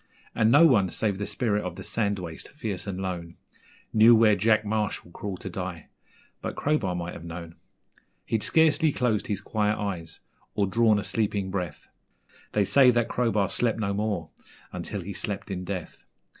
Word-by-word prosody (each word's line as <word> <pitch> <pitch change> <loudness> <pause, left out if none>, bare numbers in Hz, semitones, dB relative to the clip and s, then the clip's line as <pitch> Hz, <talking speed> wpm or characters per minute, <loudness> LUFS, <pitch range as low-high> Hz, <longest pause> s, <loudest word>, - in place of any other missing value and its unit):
And 110 -1 +3
no 145 +6 +8
one, 105 - +4
save 100 +1 -1
the 105 - -2
spirit 105 -4 0
of 90 -1 -5
the - - -8
sand 100 -3 0
waste, 85 -3 -8
fierce 110 -10 -4
and 95 -1 -4
lone, 90 -3 -4 0.6
Knew 110 +2 +7
where 110 -2 +5
Jack 110 +2 +3
Marshall 105 -4 -2
crawled 95 0 -6
to 95 - -5
die 90 -2 -6 0.5
but - - -4
Crowbar 140 -12 0
might 85 0 -4
have - - -9
known. 85 0 -7 0.7
He'd 110 -1 0
scarcely 160 +1 +4
closed 115 -6 0
his 100 -2 -2
quiet 105 0 0
eyes 90 -6 -4 0.4
or 100 - +2
drawn 110 +2 +3
a 105 - -2
sleeping 100 -4 -1
breath 90 -6 -4 0.7
They 105 -1 +3
say 135 +5 +6
that 120 -2 +2
Crowbar 110 -5 +1
slept 115 -2 0
no 100 -3 -1
more 100 -6 -2 0.4
until 100 - -4
he 100 +3 -6
slept 100 +2 -5
in 90 -1 -3
death. 90 -3 -6
100 Hz, 175 wpm, -26 LUFS, 90-110 Hz, 0.7 s, no